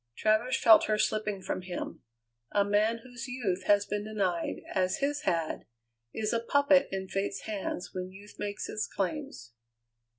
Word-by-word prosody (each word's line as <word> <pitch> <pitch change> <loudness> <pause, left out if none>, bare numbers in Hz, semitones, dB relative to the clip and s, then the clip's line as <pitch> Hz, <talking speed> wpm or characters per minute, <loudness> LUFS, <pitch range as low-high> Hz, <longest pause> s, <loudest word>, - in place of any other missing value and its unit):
Travers 220 +4 +2
felt 220 -2 +7
her 215 - +1
slipping 210 -2 0
from - - -2
him. 180 -1 -6 0.5
A 200 -1 +3
man 215 +3 +2
whose 245 +1 -8
youth 205 -8 -2
has 205 0 +4
been 205 0 -2
denied, 195 -6 -1
as 185 -1 +1
his 290 +1 0
had, 165 - 0 0.5
is 215 - -1
a 230 - +2
puppet 285 +3 +4
in 190 0 -3
Fate's 195 +1 -2
hands 200 -4 -4
when 185 0 -4
youth 200 +2 -14
makes 205 0 -3
its 215 - -2
claims. 195 - -4
205 Hz, 160 wpm, -30 LUFS, 190-230 Hz, 0.5 s, felt